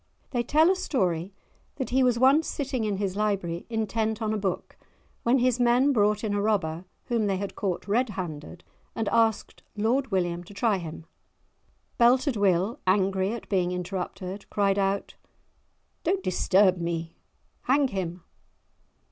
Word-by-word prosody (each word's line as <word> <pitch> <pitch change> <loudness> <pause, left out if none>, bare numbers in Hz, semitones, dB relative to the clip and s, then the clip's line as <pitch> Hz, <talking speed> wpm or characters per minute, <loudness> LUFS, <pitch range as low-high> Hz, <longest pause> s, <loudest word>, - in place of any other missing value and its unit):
They 245 - 0
tell 310 +8 +4
a - - +2
story 185 - -1 0.4
that 260 -3 -4
he 260 +1 +3
was 250 -2 +3
once 270 +6 +4
sitting 265 -5 -2
in 205 -2 -1
his 195 -2 -2
library 195 -5 -1
intent 220 -1 -1
on 220 -1 -1
a - - 0
book 190 -3 -3 0.5
when 240 +3 +3
his 250 -1 +2
men 245 +4 +4
brought 210 -2 +2
in 210 -2 -1
a 205 - 0
robber 180 -5 0 0.2
whom 230 -3 0
they 195 -1 0
had 200 +1 -4
caught 190 -2 -3
red 235 +5 +1
handed, 175 -4 -6 0.3
and 225 -2 -2
asked 225 -2 +1
Lord 235 +6 +1
William 175 -3 -1
to 200 - -13
try 210 -2 +1
him. 160 -1 -8 0.9
Belted 250 +3 +4
Will, 200 +4 +1
angry 190 0 +2
at 235 -1 -6
being 180 -3 +1
interrupted, 185 +2 -5
cried 200 -1 +1
out:—"Don't 200 - -5
disturb 185 +1 +3
me; 170 -1 -4 0.5
hang 275 +1 +3
him!" 180 -4 -4
205 Hz, 150 wpm, -26 LUFS, 185-240 Hz, 0.9 s, tell